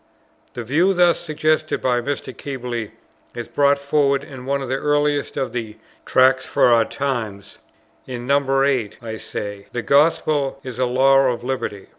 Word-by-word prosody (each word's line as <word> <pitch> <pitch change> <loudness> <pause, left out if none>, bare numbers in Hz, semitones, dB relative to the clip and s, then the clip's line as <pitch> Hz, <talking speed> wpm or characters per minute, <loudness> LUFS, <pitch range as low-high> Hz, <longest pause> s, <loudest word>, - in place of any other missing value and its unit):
The 120 - -4
view 165 - +2
thus 175 -1 +4
suggested 155 -1 0
by 125 -1 +1
Mr. 135 0 -4
Keble, 125 -5 -5 0.5
is 120 -1 -5
brought 140 0 +2
forward 140 -1 +1
in 130 -2 -10
one 140 0 -1
of - - -5
the 130 +2 -1
earliest 145 0 0
of 130 - -2
the 110 -3 -5 0.3
"Tracts 130 0 +4
for 120 - +3
the 115 - +2
Times." 110 -8 -4 0.5
In 120 -1 -6
No. 135 0 +2
8 130 -7 0
I 110 -2 -6
say, 100 -2 -7
"The 120 - -3
Gospel 145 +1 +2
is 125 -2 -7
a 130 - +2
Law 135 +2 +4
of 120 -1 -5
Liberty. 125 -6 -4
135 Hz, 165 wpm, -21 LUFS, 120-140 Hz, 0.5 s, thus